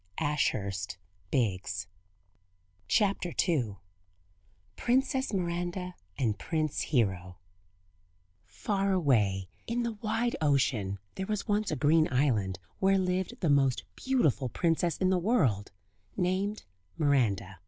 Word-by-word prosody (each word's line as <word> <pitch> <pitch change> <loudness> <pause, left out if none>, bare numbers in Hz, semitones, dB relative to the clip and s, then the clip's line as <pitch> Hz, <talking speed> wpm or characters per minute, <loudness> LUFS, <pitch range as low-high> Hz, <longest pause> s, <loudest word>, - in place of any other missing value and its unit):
[Illustration: 100 -11 -1 0.3
THROUGH 95 -6 -1 1.0
THE 195 - +2
TELESCOPE] 125 - +1 1.0
PRINCESS 265 +2 +1
MIRANDA 175 -1 -2 0.2
AND 110 -6 0
PRINCE 155 -3 -1
HERO 95 - 0 1.1
Far 195 -1 -1
away, 105 - +2 0.2
in 240 +1 0
the 235 - -1
wide 225 +3 -1
ocean 130 -9 +1 0.2
there 190 - -4
was 210 0 -2
once 210 -1 +1
a - - 0
green 155 0 +3
island 115 -9 +1 0.2
where 195 0 +4
lived 185 +6 -1
the 170 - +2
most 135 -3 +3
beautiful 155 - +1
princess 170 +3 +1
in 185 -1 +2
the 185 - +3
world, 145 - +1 0.5
named 190 +3 0 0.3
Miranda. 105 - +1
155 Hz, 110 wpm, -30 LUFS, -, 1.1 s, where